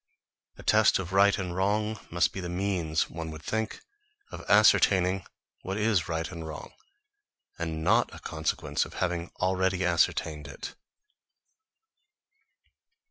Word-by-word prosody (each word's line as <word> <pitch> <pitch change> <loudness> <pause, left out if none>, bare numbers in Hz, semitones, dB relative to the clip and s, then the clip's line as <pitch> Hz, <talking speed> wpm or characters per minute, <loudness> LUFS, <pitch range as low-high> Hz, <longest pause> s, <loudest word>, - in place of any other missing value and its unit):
A - - -11
test - - +4
of 95 0 -5
right 100 +1 +5
and 90 -3 -4
wrong 105 +3 0
must 85 +1 +1
be - - -5
the 90 -2 -5
means, 90 -4 0
one 80 -1 -6
would 80 -1 -9
think, 110 0 -3 0.5
of - - -8
ascertaining 95 -3 +4 0.3
what 95 +2 -4
is 105 -5 +1
right 80 +2 -2
or 85 -3 -7
wrong, 80 -1 -8 0.9
and 80 -2 -3
not - - +3
a - - -10
consequence 80 0 -2
of - - -10
having 85 -2 -2
already 95 0 +1
ascertained 80 -3 +1
it. 70 - -8
90 Hz, 135 wpm, -28 LUFS, 80-95 Hz, 0.9 s, right